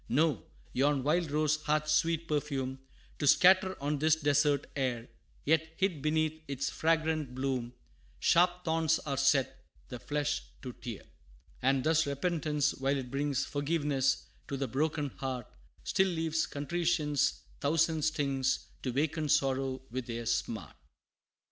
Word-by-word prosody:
No 140 - +2 0.3
yon 140 0 +2
wild 160 +3 +1
rose 155 +1 +1
hath 150 0 +1
sweet 165 +1 +1
perfume 135 -3 -2 0.4
To 145 - 0
scatter 185 +4 +5
on 145 +1 -1
this 155 +1 +4
desert 145 -2 +2
air; 125 -4 -1 0.4
Yet, 160 +1 +1
hid 185 -7 0
beneath 155 +1 0
its 140 0 -2
fragrant 160 -4 0
bloom, 130 -2 -2 0.4
Sharp 175 +1 +3
thorns 160 -1 +2
are 140 -3 -4
set, 135 -1 +2 0.3
the 125 - -6
flesh 145 +1 -1 0.2
to 125 -2 -6
tear. 115 -3 -8 0.6
And 135 -1 +2
thus, 160 0 +3
repentance, 150 0 0
while 135 +1 0
it 125 -2 -6
brings 140 0 0
Forgiveness 145 -3 0 0.2
to 140 - -3
the 135 0 -2
broken 150 +3 -1
heart, 130 -3 -3 0.4
Still 190 - +2
leaves 160 -1 0
contrition's 150 -1 0 0.2
thousand 160 +2 +2
stings 140 -4 0
To 130 - -3
waken 150 +4 -1
sorrow 135 -2 +1
with 125 0 -4
their 115 -1 -4
smart. 110 - -2
145 Hz, 135 wpm, -31 LUFS, 135-160 Hz, 0.6 s, scatter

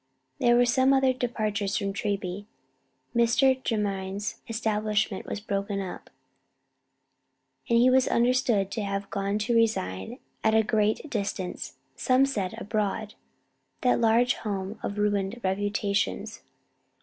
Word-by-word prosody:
There 240 0 +4
were 245 0 +5 0.3
other 265 -1 +3
departures 215 -5 -1
from 200 -2 -2
Treby. 200 -1 -3 0.7
Mr. 255 +3 +3
Jermyn's 200 -3 -2
establishment 215 -2 -1
was - - -3
broken 200 -1 -2
up, 190 -2 -6 1.6
and 235 - +4
he 240 +2 +5
was 260 0 +4
understood 235 -5 +2
to 220 - -3
have 200 0 -3
gone 200 +1 -1
to 215 +3 -1
reside 220 - 0 0.3
at 220 0 +3
a 220 - +5
great 215 +5 +1
distance: 200 -4 -3 0.2
some 260 0 +3
said 205 -9 -2
"abroad," 210 0 -2 0.7
that 250 -1 +2
large 235 +2 +4
home 200 0 -4
of 200 - -4
ruined 205 +1 0
reputations. 200 +1 -1
210 Hz, 120 wpm, -27 LUFS, 200-235 Hz, 1.6 s, were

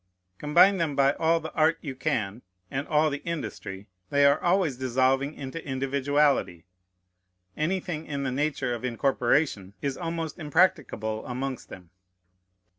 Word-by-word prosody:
Combine 180 +7 +5
them 160 -5 -1
by 140 0 +4
all 165 +2 +2
the 160 -1 -8
art 160 +1 +3
you 140 -4 -5
can, 120 -7 -2 0.3
and 135 +2 -3
all 150 0 +3
the 140 - -5
industry, 105 - -5 0.2
they 140 0 +4
are 140 0 +4
always 175 -7 +2
dissolving 130 +3 +1
into 140 +4 -6
individuality. 135 - 0 0.9
Anything 170 -1 -2
in 140 -2 -3
the 130 - -1
nature 135 -2 -1
of 120 - -5
incorporation 125 -4 0
is 140 -2 -3
almost 165 -2 -4
impracticable 150 - +1
amongst 130 +1 -4
them. 90 -2 -12
140 Hz, 135 wpm, -27 LUFS, 130-155 Hz, 0.9 s, Combine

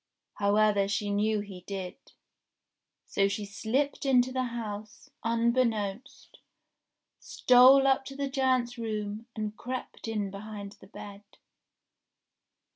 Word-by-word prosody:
However 205 0 +3
she 205 +1 -1
knew 210 +1 +1
he 195 -3 -9
did; 190 -2 -4 1.1
so 195 0 +1
she 205 +1 -3
slipped 230 +8 -1
in 260 -3 +5
to 255 - -6
the 255 0 -1
house, 215 +1 -7
unbeknownst, 230 -1 -1 0.8
stole 255 +2 +6
up 270 0 +3
to 275 - -8
the 280 0 -2
giant's 260 -3 0
room, 215 0 -4
and 215 -1 -3
crept 250 -1 -6
in 210 -3 -2
behind 200 0 -7
the - - -14
bed. 200 0 -10
220 Hz, 120 wpm, -29 LUFS, 205-255 Hz, 1.1 s, stole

